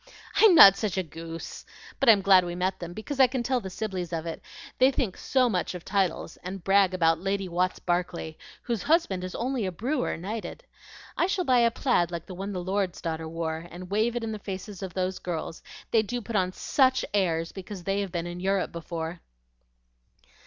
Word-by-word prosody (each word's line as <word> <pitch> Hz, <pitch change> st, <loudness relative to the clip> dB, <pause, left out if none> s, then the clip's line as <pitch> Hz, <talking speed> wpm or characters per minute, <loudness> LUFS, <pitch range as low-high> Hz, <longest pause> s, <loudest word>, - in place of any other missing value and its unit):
"I'm 430 Hz, -5 st, +7 dB
not 195 Hz, -, +10 dB
such 205 Hz, -5 st, -2 dB
a 190 Hz, -, +1 dB
goose! 165 Hz, +1 st, -8 dB, 0.4 s
But 275 Hz, -, +4 dB
I'm 205 Hz, -3 st, +6 dB
glad 190 Hz, -2 st, +6 dB
we 175 Hz, 0 st, -4 dB
met 185 Hz, +1 st, -1 dB
them, 175 Hz, -1 st, -6 dB
because 220 Hz, +9 st, -6 dB
I 260 Hz, -, +8 dB
can 250 Hz, 0 st, -2 dB
tell 260 Hz, 0 st, +1 dB
the 195 Hz, -5 st, -7 dB
Sibleys 185 Hz, -3 st, -4 dB
of 165 Hz, -1 st, -3 dB
it. 165 Hz, -, -5 dB, 0.4 s
They 260 Hz, +1 st, +7 dB
think 255 Hz, -8 st, -1 dB
so 260 Hz, -2 st, +2 dB
much 185 Hz, -4 st, -1 dB
of 175 Hz, -, -8 dB
titles, 190 Hz, -4 st, -1 dB
and 185 Hz, 0 st, -7 dB
brag 195 Hz, -1 st, +4 dB
about 165 Hz, -2 st, +3 dB
Lady 195 Hz, +1 st, -1 dB
Watts 180 Hz, +1 st, 0 dB
Barclay, 175 Hz, -2 st, -2 dB, 0.3 s
whose 235 Hz, -5 st, -2 dB
husband 295 Hz, -, +1 dB
is 185 Hz, -, -5 dB
only 255 Hz, -1 st, -1 dB
a -, -, -2 dB
brewer 250 Hz, -, -2 dB
knighted. 215 Hz, -, -6 dB, 0.5 s
I 350 Hz, -, +2 dB
shall 375 Hz, -2 st, -1 dB
buy 255 Hz, -3 st, +4 dB
a 235 Hz, 0 st, +5 dB
plaid 230 Hz, -7 st, +1 dB
like 170 Hz, -1 st, -5 dB
the 185 Hz, -, -9 dB
one 195 Hz, +3 st, -5 dB
the 180 Hz, -2 st, -4 dB
lord's 190 Hz, -1 st, -1 dB
daughter 160 Hz, -1 st, -4 dB
wore, 165 Hz, 0 st, -4 dB
and 180 Hz, +1 st, -10 dB
wave 220 Hz, +3 st, +1 dB
it 240 Hz, -, -2 dB
in 225 Hz, -, -3 dB
the 215 Hz, -, -5 dB
faces 195 Hz, 0 st, -7 dB
of 190 Hz, -3 st, -6 dB
those 185 Hz, 0 st, -1 dB
girls; 165 Hz, -2 st, -5 dB, 0.3 s
they 225 Hz, -, +5 dB
do 245 Hz, +3 st, -3 dB
put 230 Hz, -1 st, -6 dB
on 185 Hz, -2 st, +2 dB
SUCH 260 Hz, +6 st, +2 dB
airs 165 Hz, -5 st, +1 dB
because 190 Hz, -1 st, -8 dB
they 195 Hz, +2 st, 0 dB
have 195 Hz, -2 st, -4 dB
been 170 Hz, -1 st, -3 dB
in 175 Hz, 0 st, -6 dB
Europe 195 Hz, +1 st, 0 dB
before." 170 Hz, 0 st, -5 dB
190 Hz, 210 wpm, -27 LUFS, 175-225 Hz, 0.5 s, not